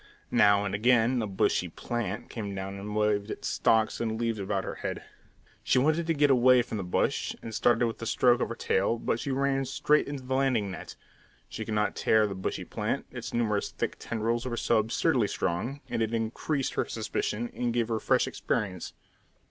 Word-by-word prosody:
Now 105 Hz, -3 st, +5 dB
and 100 Hz, -, -3 dB
again 120 Hz, +3 st, +3 dB
a 110 Hz, -, -2 dB
"bushy 95 Hz, -2 st, +1 dB
plant" 105 Hz, +2 st, -4 dB
came 100 Hz, -4 st, -5 dB
down 95 Hz, 0 st, -4 dB
and 105 Hz, +1 st, -6 dB
waved 105 Hz, -1 st, +1 dB
its -, -, -5 dB
stalks 110 Hz, 0 st, +2 dB
and 110 Hz, -1 st, -2 dB
leaves 115 Hz, -2 st, -1 dB
about 95 Hz, 0 st, -1 dB
her -, -, -4 dB
head. -, -, -4 dB, 0.6 s
She -, -, +2 dB
wanted 155 Hz, +5 st, +2 dB
to 165 Hz, -, +1 dB
get 145 Hz, -1 st, +4 dB
away 125 Hz, -1 st, +6 dB
from 115 Hz, -, -5 dB
the -, -, -3 dB
bush, 90 Hz, -, 0 dB
and 115 Hz, -, -6 dB
started 120 Hz, +2 st, +3 dB
with 115 Hz, 0 st, -4 dB
a 115 Hz, -, -3 dB
stroke 125 Hz, +1 st, +3 dB
of -, -, 0 dB
her 115 Hz, -, -4 dB
tail, 105 Hz, +3 st, +1 dB
but 115 Hz, -, -1 dB
she 140 Hz, -, -4 dB
ran 135 Hz, 0 st, +1 dB
straight 145 Hz, +3 st, +2 dB
into 140 Hz, -2 st, -5 dB
the 130 Hz, +1 st, -3 dB
landing 130 Hz, -7 st, +1 dB
net. -, -, -8 dB, 0.5 s
She 110 Hz, -, -5 dB
could 110 Hz, -, -3 dB
not 105 Hz, 0 st, +1 dB
tear 110 Hz, -1 st, +3 dB
the 100 Hz, -, -3 dB
bushy 95 Hz, 0 st, -4 dB
plant, -, -, -2 dB
its -, -, -6 dB
numerous 105 Hz, -4 st, 0 dB
thick -, -, -3 dB
tendrils 115 Hz, +2 st, -2 dB
were 120 Hz, -2 st, -3 dB
so 115 Hz, -1 st, +2 dB
absurdly 115 Hz, +2 st, +1 dB
strong; 120 Hz, +14 st, -2 dB
and -, -, -2 dB
it 110 Hz, +1 st, 0 dB
increased 120 Hz, +5 st, -2 dB
her -, -, 0 dB
suspicion 110 Hz, +1 st, -3 dB
and 120 Hz, -1 st, -1 dB
gave 115 Hz, -1 st, 0 dB
her 110 Hz, -1 st, 0 dB
fresh -, -, +2 dB
experience. 90 Hz, -4 st, -3 dB
115 Hz, 205 wpm, -28 LUFS, 105-125 Hz, 0.6 s, away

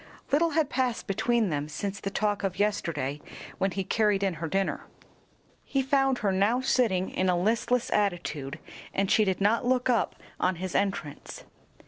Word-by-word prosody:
Little 320 Hz, +4 st, +4 dB
had 315 Hz, -3 st, +3 dB
passed 250 Hz, -2 st, 0 dB
between 225 Hz, +2 st, +1 dB
them 145 Hz, -1 st, -2 dB
since 200 Hz, +5 st, -4 dB
the 195 Hz, -, -3 dB
talk 205 Hz, 0 st, -1 dB
of 195 Hz, -2 st, -2 dB
yesterday 165 Hz, -9 st, -1 dB, 0.4 s
when 195 Hz, +1 st, +2 dB
he 195 Hz, +1 st, -3 dB
carried 210 Hz, 0 st, +1 dB
in 195 Hz, -2 st, +1 dB
her 165 Hz, -, -1 dB
dinner. 195 Hz, +3 st, -1 dB, 0.8 s
He 275 Hz, -2 st, 0 dB
found 270 Hz, -1 st, +2 dB
her 195 Hz, -, +3 dB
now 200 Hz, +6 st, +2 dB
sitting 220 Hz, -8 st, +1 dB
in 185 Hz, 0 st, 0 dB
a 180 Hz, -, +3 dB
listless 230 Hz, +5 st, +1 dB
attitude, 170 Hz, -8 st, -1 dB, 0.4 s
and 195 Hz, 0 st, +1 dB
she 215 Hz, -, +5 dB
did 190 Hz, -2 st, 0 dB
not 210 Hz, +5 st, +2 dB
look 255 Hz, +1 st, +2 dB
up 235 Hz, -, +1 dB, 0.2 s
on 185 Hz, 0 st, +1 dB
his 185 Hz, +1 st, -5 dB
entrance. 195 Hz, -7 st, -2 dB
200 Hz, 170 wpm, -28 LUFS, 185-235 Hz, 0.8 s, she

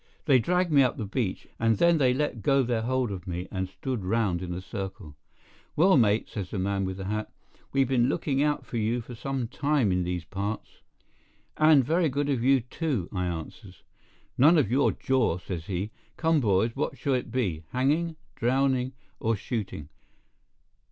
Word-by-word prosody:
They 135 Hz, -4 st, +5 dB
dragged 180 Hz, +6 st, +1 dB
me 140 Hz, -2 st, +6 dB
up 130 Hz, -, +2 dB
the 110 Hz, -, -3 dB
beach, 105 Hz, -1 st, -2 dB
and 115 Hz, -2 st, +2 dB
then 170 Hz, +3 st, +4 dB
they 130 Hz, -3 st, +4 dB
let 130 Hz, -3 st, -1 dB
go 135 Hz, +6 st, +3 dB
their 120 Hz, -2 st, 0 dB
hold 125 Hz, -1 st, 0 dB
of 95 Hz, -1 st, -7 dB
me 90 Hz, 0 st, -4 dB
and 95 Hz, -1 st, -3 dB
stood 125 Hz, +2 st, -4 dB
round 95 Hz, -3 st, 0 dB
in 90 Hz, -1 st, -5 dB
a 90 Hz, -, -3 dB
circle. 95 Hz, -5 st, -7 dB, 0.6 s
"Well, 185 Hz, +4 st, +5 dB
mate," 110 Hz, -4 st, +3 dB
says 100 Hz, -4 st, -5 dB
the -, -, -4 dB
man 95 Hz, +1 st, 0 dB
with 95 Hz, 0 st, -4 dB
the 95 Hz, -, -5 dB
hat, 105 Hz, +2 st, -3 dB, 0.4 s
"we've 135 Hz, -1 st, +2 dB
been 125 Hz, -1 st, +2 dB
looking 140 Hz, -2 st, 0 dB
out 150 Hz, 0 st, 0 dB
for 120 Hz, -, -5 dB
you 115 Hz, +2 st, 0 dB
some 125 Hz, +2 st, -4 dB
time 140 Hz, -4 st, +1 dB
in 90 Hz, 0 st, +1 dB
these 90 Hz, -1 st, -3 dB
parts." 100 Hz, +5 st, -5 dB, 0.7 s
"And 155 Hz, -4 st, +5 dB
very 165 Hz, +3 st, +2 dB
good 145 Hz, +2 st, -1 dB
of 130 Hz, -5 st, 0 dB
you, 135 Hz, 0 st, +4 dB
too," 125 Hz, -, -3 dB
I 90 Hz, -2 st, -1 dB
answers. 90 Hz, +3 st, -7 dB, 0.6 s
"None 155 Hz, +6 st, +7 dB
of 130 Hz, -8 st, +2 dB
your 135 Hz, +3 st, +3 dB
jaw," 130 Hz, -10 st, +1 dB
says 90 Hz, -3 st, -6 dB
he. 100 Hz, +3 st, -3 dB, 0.3 s
"Come, 165 Hz, -1 st, +3 dB
boys, 110 Hz, -1 st, +2 dB
what 135 Hz, -, -2 dB
shall 135 Hz, +2 st, 0 dB
it 125 Hz, -2 st, -1 dB
be—hanging, 130 Hz, -, -1 dB, 0.2 s
drowning, 130 Hz, +1 st, +1 dB, 0.3 s
or 115 Hz, +1 st, +1 dB
shooting? 100 Hz, -, -5 dB
115 Hz, 180 wpm, -27 LUFS, 95-135 Hz, 0.7 s, None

